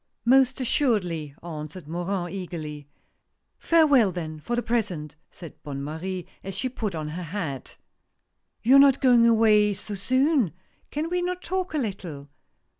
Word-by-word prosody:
" - - -49
Most 265 0 +3
assuredly," 185 - 0
answered 155 0 -7
Morin, 175 +2 -3
eagerly. 155 -6 -6 0.4
" - - -51
Farewell, 290 - +5
then, 160 -3 -5
for 205 +11 -3
the 240 - -1
present," 185 -11 -2
said 170 -3 -12
Bonne 140 -2 -6
Marie, 175 +4 -5 0.2
as 195 -1 -5
she 255 - -1
put 215 -7 -4
on 155 -1 -4
her 165 +4 -5
hat. 160 -6 -5 0.4
" 90 0 -51
You 260 +4 +7
are - - +9
not 275 -1 +6
going 245 -3 +5
away 215 -3 +4
so 205 +2 -6
soon? 255 - +2 0.4
Can 300 +3 -2
we 360 0 +1
not 360 +1 -3
talk 370 -2 -2
a - - +1
little?" 180 - -5
195 Hz, 165 wpm, -25 LUFS, 155-250 Hz, 0.4 s, are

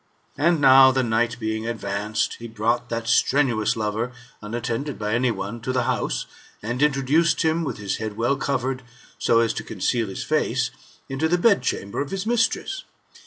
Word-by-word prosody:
And 165 +2 +2
now 135 -1 +8
the 130 0 +1
night 120 +1 0
being 110 0 -2
advanced, 105 -1 -2
he 120 - -7
brought 115 +2 -1
that 115 0 -3
strenuous 120 -1 +2
lover, 110 +2 -2 0.3
unattended 120 +5 -3
by 105 0 -2
any 125 +2 +2
one, 115 0 -4
to 130 - -2
the 125 -1 +1
house, - - -1 0.4
and 120 +4 -3
in 150 0 +5
troduced 145 +5 +2
him, 160 +1 +1
with 150 - -3
his 100 -2 -3
head 110 -1 -5
well 120 +4 +1
covered, 135 -1 -2 0.4
so 115 - +3
as 115 -1 +1
to - - -5
conceal 115 -3 -1
his 95 - -5
face, - - 0 0.4
into 135 +4 -1
the 175 - +3
bedchamber 175 - +1
of 140 - -4
his 195 +2 -3
mistress. 240 - 0
120 Hz, 175 wpm, -23 LUFS, 110-140 Hz, 0.4 s, now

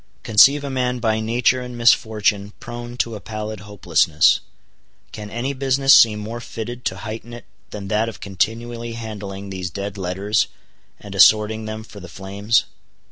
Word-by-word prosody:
Conceive 135 +7 +6
a 140 - -4
man 125 -1 -1
by 110 -2 0
nature 120 +3 +1
and 125 -1 -7
misfortune 105 -3 +2
prone 120 0 -8
to 115 -2 -1
a 105 - -6
pallid 110 +2 -6
hopelessness, 85 -6 +2 0.7
can 105 -1 -8
any 120 +6 -3
business 135 +1 +3
seem 110 -2 +7
more 110 +3 -6
fitted 120 +2 -7
to - - -1
heighten 115 +1 -7
it 120 -2 -10 0.2
than 100 -2 -7
that 110 +2 +1
of 110 - -10
continually 115 +4 -3
handling 100 -3 -7
these 95 -2 -4
dead 100 +3 -6
letters, 95 +4 0 0.5
and 100 - -10
assorting 105 +3 +4
them 110 0 -6
for 105 -2 -12
the 90 -2 -11
flames? 100 +5 0
110 Hz, 160 wpm, -21 LUFS, 100-120 Hz, 0.7 s, seem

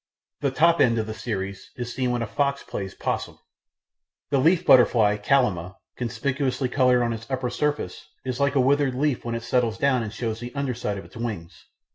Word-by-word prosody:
The 140 - +1
top 165 +5 +3
end 115 -2 +4
of 110 - 0
the 110 - -5
series 100 -3 -5
is 120 -1 -5
seen 130 -1 -1
when 120 -1 0
a - - -1
fox 140 +6 -1
plays 95 -2 -6
'possum. - - -3 0.9
The 140 - +3
leaf 165 +6 +3
butterfly 115 -4 +5
Kallima, 105 -7 +1 0.2
conspicuously 130 +2 -1
coloured 125 -2 +3
on 115 -1 0
its 115 +2 -8
upper 130 -2 -2
surface, 150 +3 -2 0.2
is 130 -1 -3
like 140 0 +1
a - - +4
withered 135 0 +2
leaf 140 -1 0
when 115 0 -3
it 115 - -4
settles 115 -2 +1
down 130 -1 +2
and 110 -2 -4
shows 110 0 -3
the 120 +2 -8
under 140 -2 -1
side 110 -4 -3
of 95 - -8
its - - -13
wings. 105 -8 -6
125 Hz, 200 wpm, -25 LUFS, 115-135 Hz, 0.9 s, butterfly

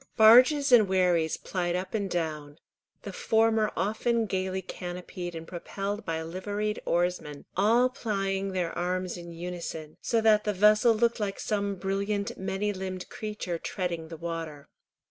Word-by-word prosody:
Barges 255 +6 +7
and 225 -5 +7
wherries 180 -4 +2
plied 175 -2 -2
up 185 +1 -4
and 200 -3 -1
down, 155 -4 -3 0.5
the 200 - -7
former 220 +1 +2
often 220 +4 +1
gaily 190 -1 -2
canopied 175 -1 -6
and 165 0 -7
propelled 200 +4 -5
by 160 -1 -2
liveried 205 +5 -3
oarsmen, 170 -4 -1
all 230 +6 +4
plying 195 -6 -2
their 175 -3 -2
arms 180 +1 -2
in 170 -1 -9
unison, 170 -2 -6
so 230 - +1
that 220 -1 +4
the 210 - 0
vessel 210 +4 +5
looked 235 +1 +1
like 200 -2 -2
some 200 -1 -1
brilliant 200 +2 -2
many 195 +2 -2
limbed 185 -1 -5
creature 210 -5 -4
treading 170 -4 -3
the 165 0 -8
water. 165 -3 -6
190 Hz, 145 wpm, -28 LUFS, 175-210 Hz, 0.5 s, Barges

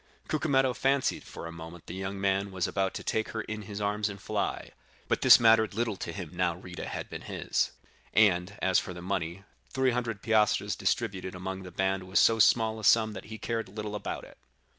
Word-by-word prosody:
Cucumetto 135 -4 +2
fancied 135 +1 +1
for - - -9
a 85 - -6
moment 85 +1 -10
the - - -7
young 95 +1 -4
man 100 0 +1
was 95 -2 -1
about 95 -1 -1
to - - -5
take 110 0 -1
her 110 - -2
in 110 0 -5
his 105 0 -7
arms 105 +1 0
and 100 -1 -8
fly; - - -3 0.4
but - - 0
this - - +9
mattered 110 -3 +5
little 115 -2 0
to - - -5
him 90 -6 -6
now 90 -1 0
Rita 90 0 -8
had - - -5
been - - -7
his; - - -1 0.4
and 100 -2 +3
as 95 -1 +4
for 90 - -6
the 90 - -8
money, 90 -1 -3 0.3
three 130 -1 +2
hundred 120 -4 -3
piastres 110 -2 +2
distributed 95 -5 -1
among 95 +1 -5
the 90 - -8
band 95 +1 -1
was 95 - +3
so 115 0 +5
small 110 0 +4
a - - -9
sum 110 0 +4
that 95 - -8
he 110 +1 -8
cared 115 -2 -3
little 105 +1 -5
about 105 - -4
it. - - -15
100 Hz, 210 wpm, -29 LUFS, 95-110 Hz, 0.4 s, this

